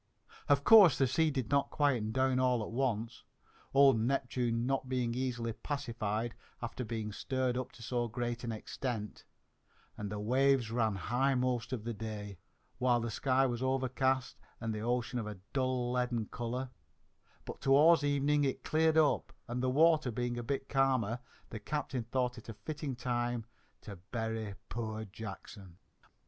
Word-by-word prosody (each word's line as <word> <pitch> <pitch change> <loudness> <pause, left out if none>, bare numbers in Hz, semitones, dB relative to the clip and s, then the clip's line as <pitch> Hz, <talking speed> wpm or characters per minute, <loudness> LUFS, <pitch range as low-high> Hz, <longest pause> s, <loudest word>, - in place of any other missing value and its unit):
Of 140 -1 +4
course 205 -6 +8
the 135 - +4
sea 155 +5 +2
did 130 -5 -3
not 140 0 +2
quiet 130 -8 +1
down 130 +1 +2
all 125 -3 +2
at - - -6
once, 120 -2 -2 0.5
old 135 -4 +6
Neptune 120 -1 0
not 135 0 -1
being 125 -2 0
easily 120 -2 -2
pacified 115 -5 -3 0.3
after 120 +1 -4
being 110 -2 -4
stirred 130 +3 -1
up 130 +1 -3
to 115 - -12
so 120 0 -1
great 120 +1 -3
an 115 - -2
extent, 110 0 -5 0.7
and 105 -1 -5
the 105 - -3
waves 130 +1 +2
ran 110 -3 +1
high 125 +8 +1
most 125 -1 0
of 125 -5 -3
the 120 +1 -3
day, 105 -3 -6 0.4
while 125 -1 +3
the 115 0 -3
sky 130 +3 +2
was 120 -2 -2
overcast 130 0 0 0.2
and 115 -1 -2
the 105 - -4
ocean 120 +2 -1
of 110 - -4
a 105 -2 -6 0.2
dull 130 -2 0
leaden 125 -3 0
colour; 125 +2 -4 0.7
but - - -8
towards 145 +3 +6
evening 145 +1 +2
it 135 -2 -1
cleared 160 0 +2
up 155 -2 +3 0.2
and, 120 +1 -3
the 130 - +1
water 155 0 +4
being 120 +1 -2
a 120 - -3
bit 135 +2 -3
calmer, 130 -4 +1 0.3
the 110 - -5
captain 135 0 -3
thought 125 0 -1
it 115 - -13
a 115 - -6
fitting 150 +1 -5
time 120 -2 -2 0.4
to 100 -2 -9
bury 110 -3 -3
poor 110 -1 -4
Jackson. 100 -3 -9
125 Hz, 165 wpm, -33 LUFS, 115-135 Hz, 0.7 s, course